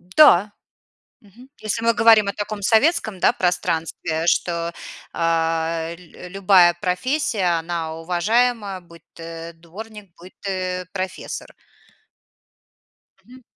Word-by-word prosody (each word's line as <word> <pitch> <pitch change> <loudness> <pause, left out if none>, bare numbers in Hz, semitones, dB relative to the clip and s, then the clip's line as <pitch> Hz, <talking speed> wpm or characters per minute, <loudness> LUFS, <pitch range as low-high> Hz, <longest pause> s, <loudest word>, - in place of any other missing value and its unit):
Да. 195 - +5 0.7
Мгм. 230 +6 -18
Если 215 +1 -3
мы 230 - +4
говорим 225 -3 +5
о - - 0
таком 205 0 -5
советском, 225 - +2
да, - - +4
пространстве, 165 -2 -1
что, 170 -1 0 0.4
а, 165 0 -1
лю 180 0 -13
любая 185 -2 +5
профессия, 185 - 0
она 165 -1 -4
уважаема, 205 +4 0
будь 170 -1 -17
ты 165 0 -8
дворник, 200 +4 -11
будь 180 +2 -14
ты 185 -2 -3
профессор. 185 -1 -6 1.7
Мгм. 255 +1 -16
180 Hz, 105 wpm, -21 LUFS, 170-215 Hz, 1.7 s, Да